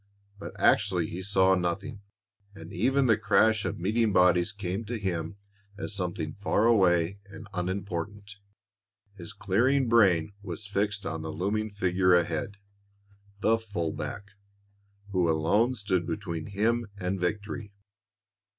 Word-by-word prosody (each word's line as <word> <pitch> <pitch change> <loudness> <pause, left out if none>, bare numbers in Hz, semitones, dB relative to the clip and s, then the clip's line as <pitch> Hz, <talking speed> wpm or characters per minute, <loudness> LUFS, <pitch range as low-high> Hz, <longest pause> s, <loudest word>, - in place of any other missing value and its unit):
But - - -9
actually 95 -5 +3
he 90 - -5
saw 95 -1 +3
nothing, 95 +5 -2 0.5
and 80 -3 -10
even 130 +8 +2
the 110 -3 +3
crash 110 0 +3
of - - -2
meeting 110 +4 +1
bodies 90 0 +4
came 100 +1 -4
to 120 +2 -4
him 90 -4 -3 0.4
as 105 - -4
something 90 -5 -3
far 105 +1 +2
away 95 -4 +3
and 100 +1 -11
unimportant. 100 +2 -4 0.8
His 95 -1 -9
clearing 120 +7 +1
brain 100 -6 +4
was 100 +1 -7
fixed 100 0 -2
on 80 0 -3
the 80 - -5
looming 100 +7 -1
figure 90 -2 +2
ahead, 85 +3 -1 0.8
the 115 0 +3
full 100 -8 -3
back, 100 +4 -6 0.8
who 90 -3 +2
alone 100 +11 +2
stood 95 -5 -1
between 85 -6 -4
him 110 +3 0
and 95 0 -2
victory. 105 +4 -3
100 Hz, 130 wpm, -28 LUFS, 90-105 Hz, 0.8 s, bodies